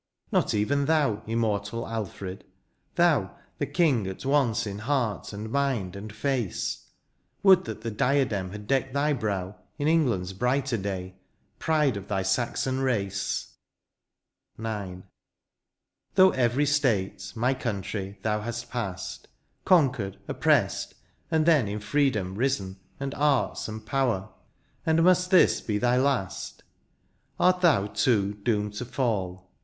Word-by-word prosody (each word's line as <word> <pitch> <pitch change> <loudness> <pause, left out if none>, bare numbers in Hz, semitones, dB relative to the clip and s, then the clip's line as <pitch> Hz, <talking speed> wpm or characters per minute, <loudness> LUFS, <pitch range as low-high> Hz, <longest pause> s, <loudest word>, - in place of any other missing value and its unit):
Not - - +2
even 140 +7 +1
thou, 145 -9 +2
immortal 110 -1 -1
Alfred, 100 -3 -5 0.3
— - - -44
thou. 155 - +2 0.2
The 145 - -1
king 140 - +2
at 95 +6 -6
once 125 -5 +2
in 100 -1 -5
heart, 120 -4 -1
and 105 +2 -6
mind, 130 -10 0
and 105 +2 -7
face; 120 -2 -2 0.6
Would 190 -2 +6
that - - -6
the 115 0 -3
diadem 115 -5 +1
had 105 +2 -8
decked 135 +2 0
thy 145 +1 +2
brow 100 -6 -3 0.2
In 145 -1 -1
England's 120 - +2
brighter 125 +4 0
day, 95 -2 -5 0.4
pride 150 -7 +2
of 100 0 -8
thy 95 -2 -1
Saxon 120 +6 0
rac^. 100 -7 -1 1.1
IX. 100 -5 -5 1.1
Through 190 -1 +7
every 130 +3 +2
state, 110 -10 0
my 125 +4 +2
country, 100 -5 -4
thou 105 -1 0
hast 120 +2 -5
past. 100 -7 -5 0.4
Conquered, 130 - +3
oppressed, - - +1 0.3
and 160 -1 +2
then 155 -9 +4
in 105 +1 -3
freedom 105 -6 0
risen. 100 -5 -1 0.2
And 140 0 -3
arts 145 -3 +1
and 110 0 -7
power 125 -9 0 0.3
— - - -40
and 160 0 +3
must 180 0 +4
this 185 -2 +5
be 105 -2 -1
thy 125 +3 +2
last? 130 -8 -1 0.8
Art 180 0 +4
thou, 155 - +4
too, 105 -2 +1
doomed 105 0 -1
to 125 - -3
fall 95 -8 -2
115 Hz, 135 wpm, -27 LUFS, 100-140 Hz, 1.1 s, Through